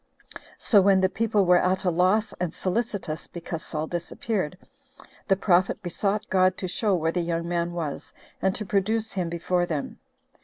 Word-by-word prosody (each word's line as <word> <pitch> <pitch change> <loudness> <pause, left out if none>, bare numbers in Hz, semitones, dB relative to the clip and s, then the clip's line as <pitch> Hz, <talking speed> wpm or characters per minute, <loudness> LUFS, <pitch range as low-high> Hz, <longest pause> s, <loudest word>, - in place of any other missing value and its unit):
So 205 -4 +4
when 195 0 +5
the 190 0 +3
people 215 -1 +1
were 180 0 +5
at 185 +1 +1
a 180 - +2
loss, 185 +6 +2
and 180 -2 -2
solicitous, 190 -5 -2
because 170 -1 -6
Saul 155 -1 -3
disappeared, 175 +1 -3 0.7
the 195 - +4
prophet 190 +1 +2
besought 195 +4 -1
God 185 0 +3
to 185 - -4
show 200 +2 +1
where 165 -1 0
the 175 - -1
young 170 0 -2
man 170 0 -1
was, 160 -5 -5 0.3
and 190 0 +1
to 210 - -3
produce 215 +3 0
him 180 -3 -2
before 175 +1 0
them. 155 -4 -4
185 Hz, 170 wpm, -26 LUFS, 170-200 Hz, 0.7 s, when